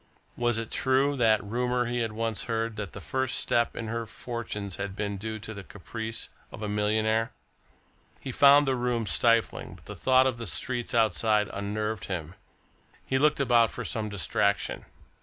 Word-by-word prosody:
Was 120 Hz, -1 st, +1 dB
it 115 Hz, -1 st, -4 dB
true, 135 Hz, +2 st, +2 dB
that 110 Hz, -4 st, +4 dB
rumour 125 Hz, +3 st, 0 dB
he 120 Hz, +1 st, -1 dB
had 115 Hz, -2 st, -1 dB
once 115 Hz, 0 st, -2 dB
heard 115 Hz, -1 st, -1 dB
that 105 Hz, -4 st, -5 dB
the -, -, -7 dB
first 130 Hz, +4 st, -1 dB
step 120 Hz, 0 st, +1 dB
in 115 Hz, -, -4 dB
her 115 Hz, 0 st, -3 dB
fortunes 105 Hz, -5 st, -5 dB
had 100 Hz, -1 st, -4 dB
been 100 Hz, -1 st, -2 dB
due 110 Hz, +2 st, -4 dB
to 110 Hz, +1 st, -7 dB
the 100 Hz, -2 st, -8 dB
caprice 110 Hz, +4 st, -6 dB, 0.2 s
of 110 Hz, -, -8 dB
a -, -, -1 dB
millionaire? 110 Hz, +2 st, +1 dB, 0.9 s
He 135 Hz, -, -5 dB
found 140 Hz, +2 st, +6 dB
the 135 Hz, -, +2 dB
room 120 Hz, -2 st, 0 dB
stifling, 115 Hz, +5 st, +1 dB
but -, -, -18 dB
the -, -, -7 dB
thought 130 Hz, 0 st, +4 dB
of 130 Hz, -3 st, 0 dB
the 115 Hz, -, -5 dB
streets 120 Hz, -2 st, -1 dB
outside 110 Hz, -1 st, +2 dB
unnerved 105 Hz, +2 st, -3 dB
him. 85 Hz, -3 st, -4 dB, 0.7 s
He 130 Hz, -, +1 dB
looked 150 Hz, +1 st, +3 dB
about 120 Hz, -4 st, +4 dB
for -, -, -6 dB
some 110 Hz, -2 st, -2 dB
distraction. 100 Hz, +1 st, 0 dB
115 Hz, 175 wpm, -28 LUFS, 105-120 Hz, 0.9 s, found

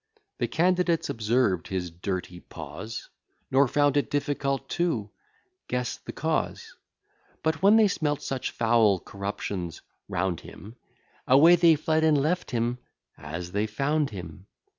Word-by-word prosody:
The -, -, +1 dB
candidates 175 Hz, -1 st, +1 dB
observed 110 Hz, -5 st, +1 dB
his 90 Hz, -2 st, -3 dB
dirty 90 Hz, 0 st, -4 dB
paws; 110 Hz, +5 st, -8 dB, 0.4 s
Nor 135 Hz, +1 st, +5 dB
found 145 Hz, +1 st, +2 dB
it 145 Hz, -, +1 dB
difficult 140 Hz, -1 st, -1 dB
to 120 Hz, -13 st, -1 dB, 0.6 s
guess 125 Hz, -1 st, -2 dB
the -, -, -9 dB
cause: -, -, -2 dB, 0.7 s
But, 160 Hz, +1 st, 0 dB
when 200 Hz, +3 st, +6 dB
they 220 Hz, -1 st, +6 dB
smelt 150 Hz, -6 st, -1 dB
such 135 Hz, -2 st, -3 dB
foul 115 Hz, -4 st, +3 dB
corruptions 100 Hz, -3 st, -5 dB, 0.3 s
round 90 Hz, -1 st, -1 dB
him, 110 Hz, +4 st, -12 dB, 0.5 s
Away 155 Hz, +7 st, +7 dB
they 170 Hz, -2 st, +5 dB
fled, 155 Hz, +1 st, +1 dB
and 155 Hz, -2 st, +4 dB
left 160 Hz, +6 st, 0 dB
him 120 Hz, +1 st, -1 dB, 0.4 s
as 85 Hz, +4 st, -7 dB
they 105 Hz, +3 st, 0 dB
found 140 Hz, +6 st, 0 dB
him. 90 Hz, -2 st, -9 dB
125 Hz, 135 wpm, -27 LUFS, 100-155 Hz, 0.7 s, Away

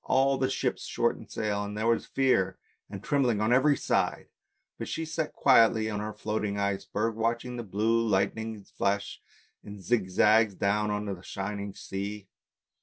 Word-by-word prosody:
All 135 Hz, +1 st, +3 dB
the 130 Hz, 0 st, +1 dB
ships 135 Hz, -, -1 dB
shortened -, -, -1 dB
sail, 105 Hz, -1 st, -2 dB
and 105 Hz, +1 st, -6 dB
there 110 Hz, -, -1 dB
was 115 Hz, 0 st, +1 dB
fear 95 Hz, -9 st, +1 dB, 0.3 s
and 100 Hz, -1 st, -8 dB
trembling 130 Hz, -7 st, +1 dB
on 110 Hz, +3 st, +2 dB
every 140 Hz, +3 st, +4 dB
side, -, -, 0 dB, 0.5 s
but -, -, -4 dB
she 160 Hz, -, -3 dB
sat 160 Hz, -1 st, -3 dB
quietly 115 Hz, -4 st, +4 dB
on 105 Hz, -, -2 dB
her 105 Hz, +1 st, -4 dB
floating 105 Hz, -1 st, -3 dB
ice 100 Hz, -1 st, -1 dB
berg 110 Hz, +2 st, -1 dB
watching 115 Hz, +2 st, -2 dB
the 120 Hz, -, -4 dB
blue 110 Hz, +3 st, +1 dB
lightning 105 Hz, +2 st, -1 dB
flash 100 Hz, +1 st, -2 dB, 0.4 s
in 105 Hz, 0 st, -9 dB
zigzags 105 Hz, +1 st, +3 dB
down 105 Hz, +2 st, +1 dB
on 105 Hz, 0 st, -2 dB
to 100 Hz, -, -3 dB
the 90 Hz, -, -10 dB
shining 100 Hz, +1 st, -5 dB
sea. 100 Hz, +1 st, -6 dB
105 Hz, 170 wpm, -28 LUFS, 100-115 Hz, 0.5 s, every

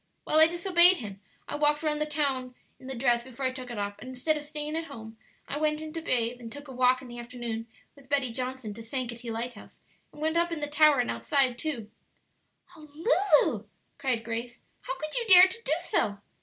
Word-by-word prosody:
Well, 310 Hz, -, +3 dB
I 315 Hz, -, +8 dB
disobeyed 345 Hz, +1 st, +5 dB
him; 200 Hz, -4 st, -8 dB, 0.3 s
I -, -, -4 dB
walked 295 Hz, +1 st, +2 dB
round 300 Hz, -1 st, 0 dB
the 300 Hz, -, 0 dB
town 270 Hz, -4 st, -1 dB, 0.2 s
in 260 Hz, -, -12 dB
the 265 Hz, -, -5 dB
dress 240 Hz, -1 st, +2 dB
before 260 Hz, +1 st, -6 dB
I 260 Hz, -, +2 dB
took 255 Hz, -1 st, -8 dB
it 240 Hz, -, -6 dB
off, 205 Hz, 0 st, -4 dB
and -, -, -10 dB
instead 260 Hz, +5 st, 0 dB
of 300 Hz, -, -4 dB
staying 300 Hz, +1 st, -5 dB
at 325 Hz, 0 st, -2 dB
home 225 Hz, -7 st, -10 dB, 0.3 s
I 290 Hz, -, -3 dB
went 305 Hz, 0 st, +1 dB
in 310 Hz, 0 st, -7 dB
to 330 Hz, -, -4 dB
bathe, 245 Hz, -5 st, +1 dB
and 230 Hz, -2 st, -9 dB
took 285 Hz, +3 st, -10 dB
a -, -, -9 dB
walk 255 Hz, 0 st, +3 dB
in -, -, -10 dB
the 240 Hz, 0 st, -9 dB
afternoon 235 Hz, -2 st, -5 dB, 0.3 s
with 275 Hz, -2 st, -19 dB
Betty 275 Hz, -4 st, +1 dB
Johnson 255 Hz, -3 st, -4 dB
to 230 Hz, -, -9 dB
Sankaty 235 Hz, 0 st, -5 dB
Lighthouse, 230 Hz, 0 st, -6 dB, 0.3 s
and -, -, -14 dB
went 315 Hz, +2 st, 0 dB
up 340 Hz, 0 st, +2 dB
in 330 Hz, -, -2 dB
the 295 Hz, -, -1 dB
tower 300 Hz, 0 st, +5 dB
and 240 Hz, -, -2 dB
outside 270 Hz, -5 st, +1 dB
too." 240 Hz, -6 st, -4 dB, 0.8 s
"Oh, 305 Hz, -2 st, -14 dB, 0.6 s
Lulu!" 215 Hz, -2 st, -3 dB, 0.3 s
cried 255 Hz, -5 st, -1 dB
Grace, 235 Hz, +1 st, -5 dB, 0.2 s
"how -, -, -5 dB
could 310 Hz, 0 st, -5 dB
you 470 Hz, -2 st, -1 dB
dare 370 Hz, -2 st, +10 dB
to 460 Hz, +5 st, -7 dB
do -, -, +1 dB
so?" 205 Hz, -, 0 dB
265 Hz, 225 wpm, -28 LUFS, 240-305 Hz, 0.8 s, dare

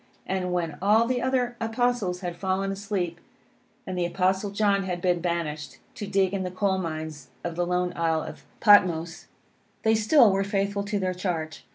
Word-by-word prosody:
And 185 Hz, -1 st, -2 dB
when 165 Hz, -4 st, -2 dB
all 215 Hz, +4 st, +4 dB
the 250 Hz, 0 st, 0 dB
other 255 Hz, -2 st, 0 dB
Apostles 225 Hz, -5 st, 0 dB
had 175 Hz, -2 st, -4 dB
fallen 190 Hz, +2 st, -1 dB
asleep, 195 Hz, -4 st, -3 dB, 0.7 s
and 185 Hz, -, -4 dB
the 175 Hz, -1 st, 0 dB
Apostle 190 Hz, +3 st, 0 dB
John 200 Hz, -1 st, +2 dB
had 180 Hz, -2 st, -3 dB
been 175 Hz, -1 st, +1 dB
banished, 155 Hz, -6 st, -3 dB, 0.2 s
to 205 Hz, -, -6 dB
dig 195 Hz, -1 st, +1 dB
in 195 Hz, -, -1 dB
the 185 Hz, -, -2 dB
coal 190 Hz, +1 st, 0 dB
mines 155 Hz, -4 st, -5 dB, 0.2 s
of 170 Hz, -1 st, -4 dB
the 175 Hz, 0 st, -1 dB
lone 180 Hz, 0 st, 0 dB
isle 165 Hz, -2 st, +1 dB
of -, -, -9 dB, 0.2 s
Patmos, 175 Hz, -6 st, +4 dB, 0.6 s
they 220 Hz, -, +4 dB
still 220 Hz, +1 st, +5 dB
were 195 Hz, +1 st, +1 dB
faithful 200 Hz, 0 st, -1 dB
to 205 Hz, 0 st, -1 dB
their 185 Hz, -2 st, -1 dB
charge. 170 Hz, -4 st, -4 dB
185 Hz, 180 wpm, -26 LUFS, 175-205 Hz, 0.7 s, still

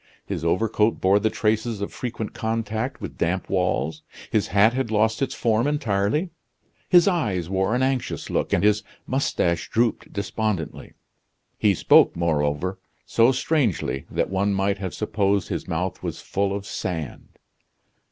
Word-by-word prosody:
His -, -, -4 dB
overcoat 105 Hz, +5 st, +1 dB
bore 95 Hz, +2 st, +4 dB
the 110 Hz, -, +1 dB
traces 110 Hz, 0 st, 0 dB
of 100 Hz, -, -4 dB
frequent 115 Hz, -3 st, -5 dB
contact 115 Hz, +3 st, -2 dB
with -, -, -7 dB
damp 90 Hz, +3 st, 0 dB
walls; 90 Hz, -4 st, 0 dB, 0.3 s
his -, -, +1 dB
hat 100 Hz, +6 st, +4 dB
had 130 Hz, -2 st, -1 dB
lost 110 Hz, +2 st, +1 dB
its 135 Hz, -, -1 dB
form 115 Hz, +2 st, +1 dB
entirely. 145 Hz, -, 0 dB, 0.6 s
His 175 Hz, 0 st, +6 dB
eyes 105 Hz, -, 0 dB
wore 95 Hz, +4 st, +1 dB
an 130 Hz, -, +1 dB
anxious 130 Hz, -1 st, -1 dB
look, -, -, 0 dB
and -, -, +2 dB
his 105 Hz, 0 st, +4 dB, 0.2 s
mustache 90 Hz, -10 st, 0 dB
drooped 115 Hz, 0 st, 0 dB
despondently. 100 Hz, -4 st, -3 dB, 0.6 s
He 100 Hz, -2 st, +2 dB
spoke, -, -, +5 dB
moreover, 85 Hz, +2 st, 0 dB, 0.3 s
so 115 Hz, +2 st, +4 dB
strangely 125 Hz, -, 0 dB
that -, -, -1 dB
one 100 Hz, +1 st, +1 dB
might 100 Hz, +1 st, 0 dB
have 95 Hz, -2 st, -4 dB
supposed 100 Hz, -3 st, 0 dB
his -, -, -3 dB
mouth 90 Hz, +2 st, -2 dB
was -, -, -4 dB
full 100 Hz, 0 st, -1 dB
of 100 Hz, 0 st, -4 dB
sand. 80 Hz, -10 st, -5 dB
105 Hz, 150 wpm, -24 LUFS, 95-115 Hz, 0.6 s, His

